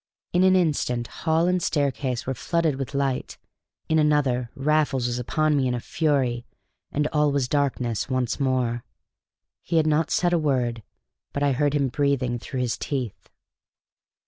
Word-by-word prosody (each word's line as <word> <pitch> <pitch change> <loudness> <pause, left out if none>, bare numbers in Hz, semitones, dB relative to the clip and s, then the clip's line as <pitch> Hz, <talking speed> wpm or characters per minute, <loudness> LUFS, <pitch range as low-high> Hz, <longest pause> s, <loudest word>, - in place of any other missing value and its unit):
In 175 - +3
an 190 0 +5
instant 145 -9 +1
hall 160 +6 0
and 180 0 +1
staircase 135 -5 -1
were 135 - -1
flooded 160 +2 0
with 140 +1 -5
light; 135 -2 -1 0.5
in 160 0 +3
another 140 -5 +2
Raffles 145 -2 +1
was 120 0 -1
upon 155 +5 +1
me 135 -2 +2
in 125 - 0
a - - -2
fury, 130 -4 0 0.5
and, 150 +1 0
all 150 -1 +3
was 140 -3 0
dark 140 0 +1 0.3
once 130 -1 -1
more. 125 -3 0 0.8
He 165 - -1
had 160 - +4
not 155 +1 +2
said 175 -1 +2
a 170 - +3
word, 125 -6 0 0.5
but 140 - -1
I 140 - +3
heard 145 +2 +1
him 140 -2 +1
breathing 130 -3 0
through 130 +2 -4
his 120 -2 -1
teeth. 130 -7 -4
140 Hz, 165 wpm, -25 LUFS, 125-150 Hz, 0.8 s, an